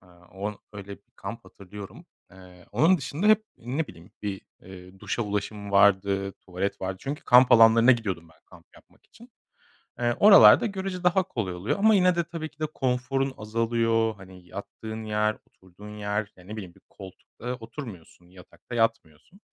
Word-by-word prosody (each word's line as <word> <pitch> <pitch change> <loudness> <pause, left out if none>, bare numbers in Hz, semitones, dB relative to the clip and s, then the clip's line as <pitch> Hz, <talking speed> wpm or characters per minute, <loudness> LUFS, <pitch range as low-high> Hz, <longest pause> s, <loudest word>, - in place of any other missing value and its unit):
Aaa, 90 -1 -22
o 100 +1 -5
öyle 100 -1 -9
bir - - -31
kamp 100 +4 -8
hatırlıyorum. 100 +1 -12 0.2
Aaa, 90 -1 -16
onun 175 +3 +4
dışında 150 +7 -3
hep 215 0 +5
ne 135 +7 -3
bileyim 90 - -15
bir, 100 -2 -4 0.2
eee, 95 0 -13
duşa 120 - -2
ulaşımım 105 0 -4
vardı, 100 0 +3
tuvalet 95 +2 -5
vardı. 95 0 -3
Çünkü 140 +2 -5
kamp 125 +1 +6
alanlarına 115 +2 +7
gidiyordum 95 -8 -3
ben 80 - -24
kamp - - -18
yapmak - - -23
için. 235 +1 -18 0.7
Eee, 120 0 +1
oralarda 205 +2 +8
görüce 190 -3 -4
daha 180 +1 +3
kolay 105 - -4
oluyor 95 - -2
ama 220 +1 +5
yine 180 -2 +4
de 170 - +1
tabii 160 -2 -6
ki 155 - -34
de 155 - 0
konforun 130 +1 -1
azalıyor. 115 0 0
Hani 95 -2 -15
yattığın 110 +3 -8
yer, 105 0 0
oturduğun 105 +3 -14
yer, 105 0 -3
ya 90 - -16
ne 105 - -8
bileyim 95 -5 -9
bir - - -22
koltukta 105 +5 -9
oturmuyorsun, 115 - -11
yatakta 90 +6 -12
yatmıyorsun. 115 - -2
105 Hz, 165 wpm, -26 LUFS, 95-130 Hz, 0.7 s, oralarda